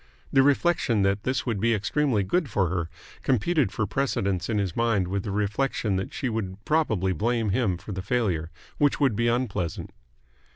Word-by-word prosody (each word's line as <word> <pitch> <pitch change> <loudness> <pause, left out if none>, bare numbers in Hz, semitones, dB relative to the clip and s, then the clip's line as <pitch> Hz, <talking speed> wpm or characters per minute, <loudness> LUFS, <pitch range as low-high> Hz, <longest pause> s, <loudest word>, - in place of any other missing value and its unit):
The 135 - +6
reflection 140 - +2
that 100 +1 +1
this 130 +1 0
would 115 -5 -1
be 115 +2 +2
extremely 110 +2 +1
good 165 - 0
for 95 -5 +1
her 85 -2 -2 0.3
competed 135 - +1
for 110 - -1
precedence 100 -9 -1
in 110 - 0
his 95 -4 -1
mind 115 -6 +1
with 100 +2 -1
the 100 - -6
reflection 105 +1 0
that 95 - -3
she 135 - -3
would 105 -5 -3
probably 110 - +1
blame 115 +4 0
him 100 -4 +1
for 105 - -9
the 95 -1 -3
failure, 95 -7 0 0.3
which 145 -1 +3
would 135 -7 +3
be 115 +2 +1
unpleasant. 115 -9 -1
110 Hz, 180 wpm, -26 LUFS, 95-130 Hz, 0.3 s, The